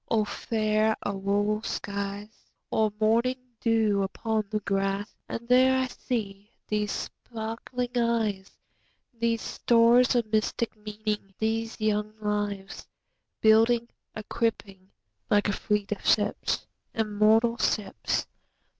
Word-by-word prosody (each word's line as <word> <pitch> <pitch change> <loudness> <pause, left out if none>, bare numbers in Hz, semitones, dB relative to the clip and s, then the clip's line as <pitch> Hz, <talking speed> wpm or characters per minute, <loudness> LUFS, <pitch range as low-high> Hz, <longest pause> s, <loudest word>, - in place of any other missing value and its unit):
O 220 -2 +2
fair 215 0 +1
auroral 205 +2 0
skies! 200 0 -5 0.2
O 220 -1 +2
morning 230 +4 +2 0.2
dew 220 -3 +2
upon 215 +3 -1
the 215 -1 -1
grass! 195 +1 -1 0.2
And 235 +1 -5
these 255 +1 +6
I 260 0 +2
see—these 210 -3 -4
sparkling 235 +2 -5
eyes, 225 -5 0 0.6
These 230 -1 0
stores 235 +1 +4
of 240 -2 +2
mystic 220 +2 0
meaning—these 215 +1 -3
young 215 0 0
lives, 205 -2 -3 0.5
Building, 230 +2 +4 0.3
equipping, 205 -3 -3 0.4
like 205 -1 +3
a 205 - +1
fleet 210 -1 -1
of 210 - -3
ships—immortal 220 +2 +1
ships! 205 -3 0
215 Hz, 100 wpm, -27 LUFS, 205-230 Hz, 0.6 s, these